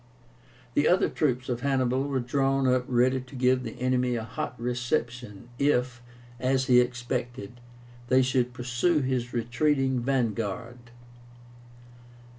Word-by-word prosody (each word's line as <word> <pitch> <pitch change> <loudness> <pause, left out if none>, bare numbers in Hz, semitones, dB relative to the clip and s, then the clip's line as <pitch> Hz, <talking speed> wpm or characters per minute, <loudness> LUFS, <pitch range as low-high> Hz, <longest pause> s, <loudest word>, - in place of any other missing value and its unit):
The 145 - +3
other 180 - +3
troops 130 -4 -1
of 125 -2 -2
Hannibal 135 0 +1
were 135 -2 -1
drawn 135 +2 +1
up 125 -1 +2
ready 130 +1 +2
to 130 +2 -13
give 130 0 +2
the - - -7
enemy 125 -1 +1
a 115 - -3
hot 120 +2 -5
reception, 120 -2 -3
if, 125 -4 +1 0.4
as 130 +1 +1
he 125 -2 +6
expected, 125 -2 -3 0.5
they 130 +1 +4
should 125 -1 +1
pursue 125 +6 0
his 130 -2 -1
retreating 130 +3 +1
vanguard. 120 -1 -2
125 Hz, 125 wpm, -27 LUFS, 120-130 Hz, 0.5 s, he